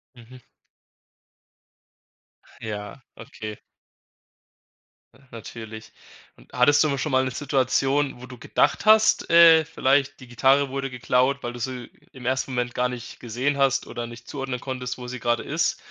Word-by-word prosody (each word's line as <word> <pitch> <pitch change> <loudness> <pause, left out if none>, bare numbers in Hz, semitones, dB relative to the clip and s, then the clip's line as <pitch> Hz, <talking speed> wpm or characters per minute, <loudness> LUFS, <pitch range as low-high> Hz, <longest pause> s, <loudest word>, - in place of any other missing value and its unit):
Mhm. 120 +1 -15 2.2
Ja, 105 +3 -7
okay. 110 -3 -9 1.6
Ja, 130 - -22
natürlich. 110 -1 -9 0.5
Und - - -21
hattest 145 +4 +4
du 155 - +1
mal 140 - -1
schon 145 +3 -3
mal 130 0 +3
'ne 130 - -1
Situation, 135 0 0
wo - - -8
du 125 0 -11
gedacht 120 - 0
hast, 215 0 +5
äh, 165 -1 +7
vielleicht: 140 -2 +1
„Die 130 - -13
Gitarre 135 +4 +2
wurde 135 0 -3
geklaut, 125 +2 0
weil 120 0 -4
du 120 - -9
sie 125 0 -5 0.2
im 130 -2 -11
1. 130 +1 -1
Moment 125 -1 -2
gar 125 0 0
nicht 125 -2 -8
gesehen 125 +5 -2
hast 135 -1 +2
oder 120 0 -5
nicht 120 +1 -12
zuordnen 135 -3 -5
konntest, 125 -2 -5
wo 125 -1 -8
sie 125 0 -6
grade 120 0 0
ist"? - - -1
130 Hz, 155 wpm, -24 LUFS, 120-140 Hz, 2.2 s, äh